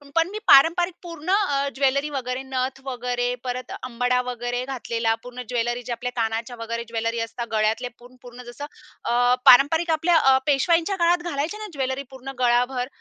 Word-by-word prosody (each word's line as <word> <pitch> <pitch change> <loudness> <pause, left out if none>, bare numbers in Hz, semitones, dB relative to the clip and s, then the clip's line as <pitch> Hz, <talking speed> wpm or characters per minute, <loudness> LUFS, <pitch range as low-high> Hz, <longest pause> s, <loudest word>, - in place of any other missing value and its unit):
पण 330 +2 +3
मी 425 +2 -6
पारंपरिक 335 +6 +6
पूर्ण 335 0 -8
अ, 285 -9 +2
ज्वेलरी 280 +2 +1
वगैरे 260 -2 -3
नथ 265 0 -3
वगैरे, 245 -1 -2
परत 255 0 -5
अंबाडा 250 0 0
वगैरे 245 +1 -3
घातलेला. 230 -4 -1
पूर्ण 250 0 -8
ज्वेलरी 240 0 -1
ज्या 240 -1 -4
आपल्या 250 0 -3
कानाच्या 225 +2 -2
वगैरे 230 +1 -4
ज्वेलरी 230 0 -2
असतात, 230 +1 -4
गळ्यातले 220 +3 +1
पूर्ण 245 +1 -16
पूर्ण 245 0 -11
जसं 285 +4 -7 0.4
अ, 245 +1 +3
पारंपरिक 320 +6 +6
आपल्या 325 +2 +3
अ, 265 -3 +5
पेशवाईंच्या 335 +7 +2
काळात 345 0 +2
घालायचे 305 +9 -2
ना 430 0 -7
ज्वेलरी 265 0 -2
पूर्ण 265 +1 -8
गळाभर, 245 +1 +1
255 Hz, 165 wpm, -23 LUFS, 245-290 Hz, 0.4 s, पारंपरिक